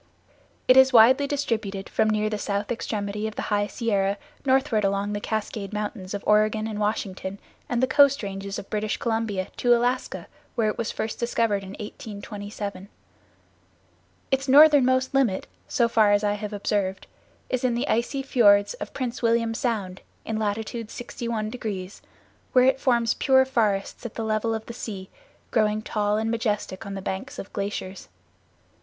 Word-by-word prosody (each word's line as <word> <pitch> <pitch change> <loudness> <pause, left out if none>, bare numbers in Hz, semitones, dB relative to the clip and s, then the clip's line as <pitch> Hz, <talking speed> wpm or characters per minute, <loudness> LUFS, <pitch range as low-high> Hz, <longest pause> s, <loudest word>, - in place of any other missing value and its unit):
It 255 - +7
is 265 0 +7
widely 255 +4 +6
distributed 220 -9 -2
from 215 - +1
near 215 0 +1
the 215 -1 -2
south 205 +1 -2
extremity 210 -2 -3
of 215 - -7
the - - -3
high 205 0 +2
Sierra 200 -4 0 0.3
northward 260 -5 +2
along 200 +1 0
the 205 - -2
Cascade 215 -2 -3
Mountains 210 -2 -4
of 200 - -5
Oregon 215 +1 +3
and 215 -1 -4
Washington 200 -2 -2 0.3
and 245 +1 0
the - - +4
coast 280 -1 +5
ranges 195 0 -5
of 195 - -7
British 215 0 -1
Columbia 225 -5 -1
to 240 -1 +4
Alaska, 245 +2 -1 0.3
where 220 -2 +2
it - - -4
was 235 - -1
first 220 - -4
discovered 230 -3 +1
in 195 0 -9
1827. 205 -1 -7 1.4
Its 270 +1 +1
northernmost 265 -2 +6
limit, 255 -9 +2 0.2
so 235 - +2
far 220 -3 +4
as 205 +1 +2
I 205 0 +2
have 210 0 -5
observed, 200 -2 -1 0.4
is 255 -1 -2
in 245 -2 +2
the 250 +5 -1
icy 255 +4 0
fiords 205 -6 +4
of 205 - -6
Prince 250 -2 -3
William 230 -1 +2
Sound 215 -7 -2 0.2
in 220 -1 -2
latitude 220 +2 -3
61°, 220 -5 -5 0.5
where 255 0 +6
it 265 0 +3
forms 235 -3 +2
pure 265 -1 +4
forests 215 -7 0
at 235 - -7
the 225 - -3
level 220 +1 0
of 220 0 -6
the 235 - -7
sea, 195 -5 -7 0.4
growing 215 -1 +1
tall 210 -1 0
and 220 +1 -1
majestic 210 -3 -2
on 200 - -5
the 195 - -6
banks 260 +11 -5
of 195 - -8
glaciers. 195 -1 -4
215 Hz, 165 wpm, -25 LUFS, 205-240 Hz, 1.4 s, It